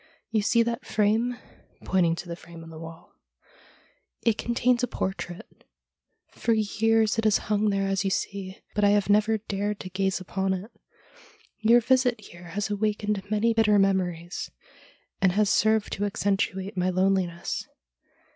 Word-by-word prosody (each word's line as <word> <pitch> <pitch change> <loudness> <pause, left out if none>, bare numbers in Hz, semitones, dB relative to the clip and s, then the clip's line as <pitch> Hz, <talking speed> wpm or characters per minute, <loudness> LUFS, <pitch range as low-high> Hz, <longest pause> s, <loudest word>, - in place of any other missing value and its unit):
You 220 -1 +2
see 230 +3 +3
that 235 0 -3
frame 220 +4 +1 0.2
' - - -28
— - - -22
pointing 170 -3 +2
to 175 - -8
the 170 - -5
frame 170 0 -12
on 165 - -11
the 160 - -10
wall 165 +1 -11 0.4
— - - -28
' - - -45
it 230 -2 +4
contains 240 +2 +1
a 250 - +1
portrait. 185 -5 -5 0.7
For 230 - 0
years 220 +1 +2
it - - 0
has 215 -2 +5
hung 210 0 +2
there 195 -1 0
as 195 0 0
you 195 - 0
see, 190 0 -4
but 210 - 0
I 205 - +6
have 205 0 +2
never 215 +2 +3
dared 205 0 -3
to 185 - -8
gaze 190 +1 0
upon 190 +1 -1
it. 195 +6 -8 0.9
Your 230 +2 +5
visit 250 -1 +2
here 175 -4 -13
has 200 +5 -3
awakened 210 -1 -1
many 215 +2 +2
bitter 215 -2 +4
memories, 180 -3 0 0.7
and 185 -2 +4
has 210 +1 +2
served 220 0 +2
to 205 - -1
accentuate 195 -1 -1
my 180 0 +1
loneliness. 185 -2 0
205 Hz, 170 wpm, -26 LUFS, 190-220 Hz, 0.9 s, I